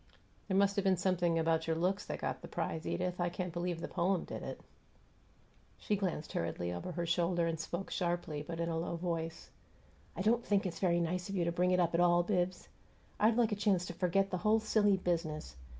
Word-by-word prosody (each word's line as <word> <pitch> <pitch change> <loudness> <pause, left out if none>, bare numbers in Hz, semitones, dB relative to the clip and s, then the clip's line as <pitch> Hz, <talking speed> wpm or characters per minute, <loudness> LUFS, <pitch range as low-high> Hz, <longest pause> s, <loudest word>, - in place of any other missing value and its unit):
"There 190 -2 +1
must 200 +1 +3
have 200 - +2
been 190 -2 +3
something 175 -2 +1
about 160 0 +1
your 165 - +1
looks 185 +5 0
that - - -3
got - - -2
the - - -8
prize, 160 0 -3
Edith; 180 0 -1
I 175 - +1
can't 180 0 -4
believe 175 -1 -2
the - - -4
poem 180 0 +1
did - - -6
it." - - -6 1.2
She 210 - 0
glanced 185 -6 -3
hurriedly 85 +1 -2
over 90 - -5
her 170 +1 -2
shoulder 170 0 +1
and 165 -1 -1
spoke 175 +4 -4
sharply, 175 -4 -1
but 165 +2 -6
in 170 - 0
a 165 -1 -1
low 170 +1 -2
voice: 165 -1 -4 0.6
"I 190 - -2
don't 230 +3 +3
think 200 -3 +1
it's 175 -2 -3
very 175 -2 +3
nice 175 +2 -1
of 200 - -3
you 175 -3 +1
to 170 - +1
bring 180 +1 +2
it 180 0 +3
up 170 -1 +2
at 170 - +2
all, 175 0 +5
Bibbs. 180 -1 -1 0.5
I'd 220 +2 +4
like 235 -2 +3
a - - +1
chance 200 -4 +2
to 175 - -5
forget 195 +3 +1
the 185 - 0
whole 215 +4 +3
silly 210 -2 +3
business. 165 - -2
175 Hz, 225 wpm, -34 LUFS, 170-190 Hz, 1.2 s, all